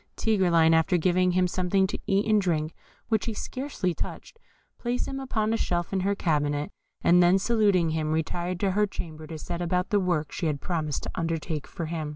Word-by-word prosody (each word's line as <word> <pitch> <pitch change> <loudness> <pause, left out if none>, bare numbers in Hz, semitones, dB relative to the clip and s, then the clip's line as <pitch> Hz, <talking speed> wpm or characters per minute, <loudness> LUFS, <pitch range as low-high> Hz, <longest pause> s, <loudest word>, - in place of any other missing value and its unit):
Tigreline, 175 -7 +3
after 160 +3 +3
giving 180 +1 +2
him 180 0 +3
something 185 +2 +1
to 190 - -4
eat 195 +1 +2
and 215 -1 +3
to - - -5
drink, 155 -2 0 0.4
which 220 -2 +1
he 225 - -2
scarcely 255 -8 -3
touched, 460 - -7 0.4
placed 245 +1 -2
him 270 - -4
upon 225 -5 -1
a - - +1
shelf 175 -2 -1
in 190 - +1
her 200 +2 +1
cabinet, 145 -4 0 0.3
and 180 +1 +5
then 175 +2 +5
saluting 200 -5 +2
him, 155 -1 -1
retired 175 +3 -2
to 195 -2 +2
her 210 +2 +2
chamber 155 -5 -7
to 160 0 -6
set 170 +2 -5
about 180 +1 -1
the 205 - +4
work 175 -5 0
she 170 - -2
had 150 -2 -1
promised 155 -2 -2
to - - -4
undertake 165 -2 -3
for 170 - -5
him. 160 -2 -3
180 Hz, 205 wpm, -27 LUFS, 160-200 Hz, 0.4 s, and